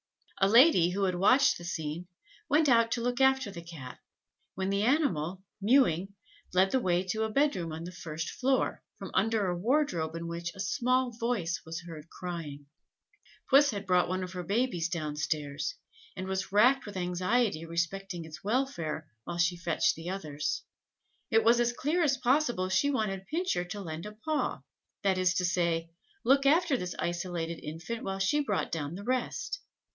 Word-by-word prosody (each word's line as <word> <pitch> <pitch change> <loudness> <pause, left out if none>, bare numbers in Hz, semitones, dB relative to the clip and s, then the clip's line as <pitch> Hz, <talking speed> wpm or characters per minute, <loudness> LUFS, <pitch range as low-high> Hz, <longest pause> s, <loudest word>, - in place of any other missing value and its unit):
A 195 - +5
lady, 230 - +6
who 195 +2 -1
had 185 -1 +2
watched 200 +9 +4
this 175 0 -4
scene, 160 +2 -4 0.4
went 300 +2 +4
out 230 -3 +5
to 240 - -2
look 245 +2 -1
after 265 -5 +3
the 170 - -8
Cat, 155 -7 -10 0.6
when 190 +1 -1
the 200 0 +1
animal, 190 - +1 0.2
mewing, 200 - +3 0.4
led 190 +2 +3
the 260 - +3
way 180 -5 +1
to 205 +4 -2
a 220 - 0
bed 285 +5 +2
room 170 -3 -4
on 160 +1 -6
the 175 - -6
first 165 -2 -5
floor, 265 0 0 0.2
from - - -8
under 225 -2 +2
a 180 -1 0
wardrobe 180 - 0
in 165 0 -5
which 170 +1 -4
a - - -13
small 255 +4 +1
voice 230 -7 -2
was 165 +1 -6
heard 165 -2 -10
crying. 160 -5 -6 0.9
Puss 285 +2 +7
had 200 -4 -4
brought 180 -1 +3
one 185 0 -1
of 180 - -6
her 180 -1 -4
babies 195 -2 0
down 155 -4 -3
stairs, 150 - -2 0.4
and 185 - -4
was 190 0 -3
racked 245 +5 +4
with 205 -2 -6
anxiety 185 +1 0
respecting 170 +1 -3
its 160 +1 -11
welfare 195 - -1 0.2
while 175 - -5
she 175 +1 +2
fetched 170 -2 +1
the 165 +2 -7
others. 155 -6 -3 0.7
It 225 - +4
was 235 +1 +5
as 240 0 +2
clear 305 +8 0
as 280 -5 +3
possible 245 -7 +1
she 190 +10 +2
wanted 200 -8 -2
Pincher 330 - -1
to 205 +4 -6
lend 165 -1 -6
a 210 - -8
paw 300 +8 -2 0.4
that 190 -2 +2
is 180 -1 +2
to 180 - +1
say, 170 -2 0 0.3
look 275 +2 +4
after 325 0 +4
this 180 -7 -4
isolated 175 -1 -3
infant 165 +10 -5
while 195 0 -3
she 195 +10 +2
brought 215 -9 -1
down 155 0 -3
the 200 - -7
rest. 255 - -2
190 Hz, 180 wpm, -30 LUFS, 170-240 Hz, 0.9 s, Puss